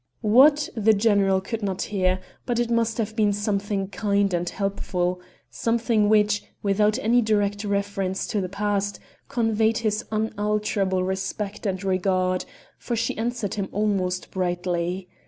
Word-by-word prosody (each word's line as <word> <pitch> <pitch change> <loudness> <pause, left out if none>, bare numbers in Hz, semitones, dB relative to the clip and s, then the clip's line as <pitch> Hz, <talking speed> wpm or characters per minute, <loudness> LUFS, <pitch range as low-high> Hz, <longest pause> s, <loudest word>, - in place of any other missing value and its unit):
What, 285 +7 +6
the 220 -1 +4
general 200 -2 +3
could 225 +3 -4
not 195 -2 -2
hear, 185 -2 0 0.3
but 240 -2 0
it 240 0 0
must 230 -1 +1
have 220 -1 -2
been 210 -2 +3
something 200 -1 -1
kind 200 -2 +1
and 175 0 0
helpful 180 -2 -2 0.3
something 230 -2 +1
which, 210 -1 +3 0.2
without 210 +2 +2
any 245 -1 +3
direct 205 -2 0
reference 200 -2 -1
to 210 -3 0
the 185 - -3
past, 205 0 -1 0.3
conveyed 225 -3 +1
his 215 -2 -1
unalterable 210 -3 0
respect 195 +3 -3
and 190 -1 -2
regard, 185 -1 +1 0.3
for 240 - -3
she 230 0 -1
answered 230 -2 -2
him 200 -2 -3
almost 190 -3 -1
brightly. 180 0 -2
205 Hz, 140 wpm, -24 LUFS, 190-220 Hz, 0.3 s, What